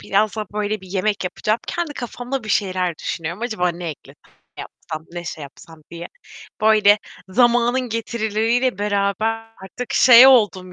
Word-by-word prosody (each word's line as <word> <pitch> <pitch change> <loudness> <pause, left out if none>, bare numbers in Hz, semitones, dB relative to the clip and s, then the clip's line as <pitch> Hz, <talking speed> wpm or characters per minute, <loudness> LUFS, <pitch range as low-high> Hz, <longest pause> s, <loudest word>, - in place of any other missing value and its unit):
birazdan, 215 +1 -1
böyle, 210 0 -2
bir 190 - -14
yemek 195 +1 -1
yapacağım. 215 +4 -1
Kendi 345 -3 -3
kafamda 245 +1 -5
bir 215 - -9
şeyler 185 -4 0
düşünüyorum: 170 +6 -5
Acaba 220 -7 -1
ne 175 0 -5
eklesem, 150 - -14 0.4
ne - - -7
yapsam, 160 0 -9
ne 175 0 -6
şey 160 -2 -7
yapsam 155 +3 -14
diye. 170 0 -8 0.5
Böyle, 215 -1 +5 0.3
zamanın 240 +3 +2
getirileriyle 230 0 -1
beraber 210 +2 -2
artık 245 +6 -7
şey 250 0 +8
oldum 200 -8 +3
215 Hz, 145 wpm, -20 LUFS, 185-235 Hz, 0.5 s, şey